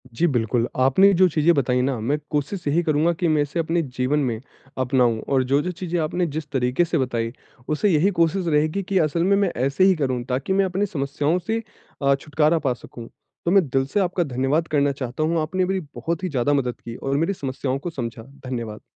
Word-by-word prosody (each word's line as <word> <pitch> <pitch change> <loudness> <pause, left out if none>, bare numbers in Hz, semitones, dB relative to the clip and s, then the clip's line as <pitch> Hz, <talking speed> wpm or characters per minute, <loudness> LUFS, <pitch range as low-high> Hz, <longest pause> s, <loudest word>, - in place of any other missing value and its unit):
जी, 175 - +2
बिल्कुल 120 -3 0
आपने 160 +10 +5
जो 185 +1 +5
चीज़ें 160 +2 +3
बताई 125 -2 +1
ना 130 -2 -1
मैं 135 +7 0
कोशिश 150 +4 -2
यही 155 +4 +2
करूँगा 155 +1 +2
की 170 +1 -1
मैं 155 -2 +3
इसे 145 +4 -2
अपने 165 +1 +1 0.2
जीवन 130 +4 +1
में 120 -6 -1 0.4
अपनाऊँ 125 -3 +2
और 135 -2 +1
जो-जो 140 +7 +1
चीज़ें 175 -1 -3
आपने 175 +3 0
जिस 155 -2 -4
तरीक़े 130 +5 +1
से 165 -1 -1
बताई 120 -3 -1 0.4
उससे 155 +7 +1
यही 170 +3 +3
कोशिश 170 +2 +2
रहेगी 155 +5 +1
कि 190 +1 -1
असल 165 +2 +1
में 200 +2 +3
मैं 200 -3 +1
ऐसे 140 +6 +1
ही 190 0 +5
करूँ 130 -5 -1
ताकि 130 +8 -1
मैं 195 0 +3
अपनी 190 +2 0
समस्याओं 145 0 -1
से 225 +6 -2 0.4
अ, 140 0 +4
छुटकारा 155 +3 +1
पा 135 -5 0
सकूँ। 120 -1 -11 0.4
तो 170 - +2
मैं 190 -4 +4
दिल 135 +1 +1
से 205 - +3
आपका 180 -1 +1
धन्यवाद 140 +4 0
करना 145 -2 +2
चाहता 135 +2 -4
हूँ, 165 +1 +1
आपने 185 +4 0
मेरी 190 +1 -1 0.2
बहुत 170 +2 -3
ही 185 - -1
ज़्यादा 140 -1 +1
मदद 125 -4 -1
की 115 - -8
और 135 +2 -2
मेरी 165 +6 +1
समस्याओं 135 -4 -3
को 175 - -4
समझा। 115 -7 -6
धन्यवाद। 125 -5 -7
150 Hz, 215 wpm, -23 LUFS, 130-175 Hz, 0.4 s, आपने